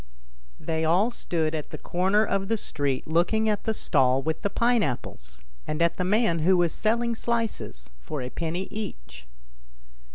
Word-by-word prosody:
THEY 160 0 -2
all 180 +9 +3
stood 160 -8 -1
at 155 -2 -4
the - - -7
corner 190 +5 +1
of 195 -1 -1
the 225 - +1
street 140 -8 -2
looking 175 +8 +2
at 210 -1 0
the 220 - +1
stall 130 -6 +3
with 160 +1 -2
the 200 - 0
pine 235 +3 +2
apples, 65 - -4 0.3
and 150 - -2
at 170 0 +2
the 180 - 0
man 200 -2 +2
who 180 +4 +4
was 175 -2 +2
selling 235 +2 +1
slices 225 - -3
for 145 - -5
a 125 - -6
penny 170 +3 -3
each. - - -7
175 Hz, 170 wpm, -26 LUFS, 155-215 Hz, 0.3 s, who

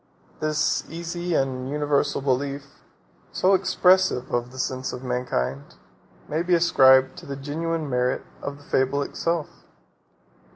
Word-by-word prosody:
49 155 - 0
This 155 +1 +1
easy 170 +1 -3
and 130 -2 -1
universal 145 -1 0
belief, 140 +1 -1 0.7
so 190 +2 +2
expressive 185 -7 +3
of 120 0 -1
the 130 - -12
sense 130 0 -2
of 125 - -7
mankind, 125 - -3 0.5
may 155 +2 -1
be 175 0 +2
ascribed 130 -6 +5
to - - -13
the 140 - -4
genuine 155 +3 -3
merit 125 -1 0 0.2
of 140 0 -5
the 145 - -17
fable 135 +1 +1
itself. 165 +1 -2
140 Hz, 135 wpm, -24 LUFS, 130-165 Hz, 0.7 s, ascribed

